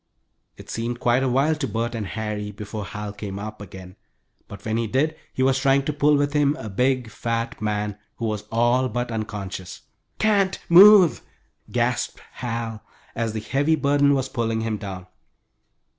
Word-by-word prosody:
It - - -12
seemed 120 +1 -3
quite 120 +1 +2
a 135 - +1
while 135 +5 +2
to 150 -3 -3
Bert 115 +1 -2
and 110 -4 -3
Harry 105 -1 -4
before 105 +1 -6
Hal 105 0 -6
came 100 -1 -6
up 105 +1 -7
again, 95 -1 -11 0.5
but 100 - -11
when 110 0 0
he 115 -1 -1
did 150 +7 +1 0.2
he 130 - -1
was 135 0 +3
trying 135 0 +3
to 150 - -1
pull 150 0 +3
with 145 0 0
him 145 -1 +3
a 110 -8 -7
big, 125 +2 0
fat 115 +1 -3
man, 105 -1 -2 0.2
who 115 - -4
was 105 -2 -3
all 120 +3 +2
but 120 +2 -3
unconscious. 105 -4 -5 0.4
"Can't 200 -3 +2
move," 190 0 +8 0.5
gasped - - -1
Hal, 115 -3 -4 0.3
as 115 -1 -2
the 110 - -2
heavy 145 +8 +1
burden 140 -1 +3
was 135 -1 -1
pulling 115 -3 -1
him 110 -1 -2
down. 95 -3 -7
115 Hz, 175 wpm, -23 LUFS, 105-135 Hz, 0.5 s, move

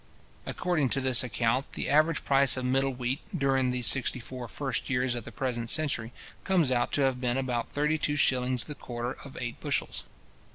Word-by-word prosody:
According 165 -7 0
to - - +2
this 130 -2 +4
account, 125 +2 -1
the - - -2
average 155 +2 +2
price 135 -1 +4
of 130 - -3
middle 135 +2 +1
wheat, 125 +1 -3 0.2
during 135 -3 +1
these 125 -1 0
sixty 135 -1 +4
four 125 +1 -8
first 135 -1 -3
years 125 -1 +1
of 120 -2 -5
the - - -9
present 120 -1 -3
century, 130 -7 +1 0.3
comes 175 -8 +2
out 120 -1 0
to 145 - +2
have 130 -2 +1
been 125 0 0
about 125 -3 -2
thirty 150 +2 0
two 145 - 0
shillings 125 -3 +2
the 150 - -7
quarter 120 -1 -5
of 140 - -11
eight 120 -2 -5
bushels. - - -2
130 Hz, 195 wpm, -28 LUFS, 125-140 Hz, 0.3 s, this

